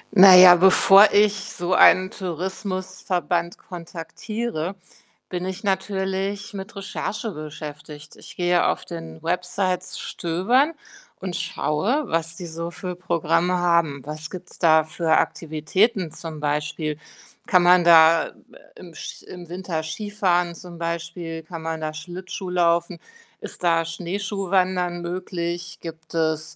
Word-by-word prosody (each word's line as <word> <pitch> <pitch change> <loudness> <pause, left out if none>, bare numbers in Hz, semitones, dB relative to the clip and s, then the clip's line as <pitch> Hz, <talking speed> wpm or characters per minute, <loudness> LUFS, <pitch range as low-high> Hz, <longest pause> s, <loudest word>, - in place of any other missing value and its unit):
Na 185 0 +10
ja, 180 -1 +10
bevor 195 +2 +7
ich 205 0 +4
so 185 -3 -3
einen 185 +1 +6
Tourismusverband 185 -1 -3
kontaktiere, 175 +3 -5 0.5
bin 180 -1 -4
ich 190 +2 -5
natürlich 195 +1 -2
mit 195 +1 -8
Recherche 205 +2 -4
beschäftigt. 150 -1 -9
Ich - - -12
gehe 175 0 +2
auf - - -2
den 165 -2 -9
Websites 180 +1 -2
stöbern 230 - 0 0.5
und 180 -3 -5
schaue, 185 - -1
was 165 0 -1
die 180 - -7
so 170 +1 -5
für 180 0 -6
Programme 170 0 0
haben. 170 -5 +1
Was 155 +1 -6
gibt's 185 -1 -9
da 160 -2 +5
für 160 0 +1
Aktivitäten 165 +4 0
zum 160 -2 -7
Beispiel? 150 +1 -2 0.5
Kann 180 -1 +4
man 180 0 +6
da, 165 -1 +6
äh, - - -14 0.4
im 175 -2 -13
sch - - -9
im 175 -2 -11
Winter 175 -3 -4
Skifahren 180 0 -1
zum 170 0 -11
Beispiel? 170 0 -5
Kann 160 0 -9
man 160 -1 -4
da 155 0 -2
Schlittschuh 180 +3 -7
laufen? 170 0 +1 0.4
Ist - - -9
da 165 -1 +3
Schneeschuhwandern 185 0 -1
möglich? 175 -1 -5
Gibt 165 -1 -10
es 160 -1 -1
175 Hz, 130 wpm, -23 LUFS, 165-185 Hz, 0.5 s, Na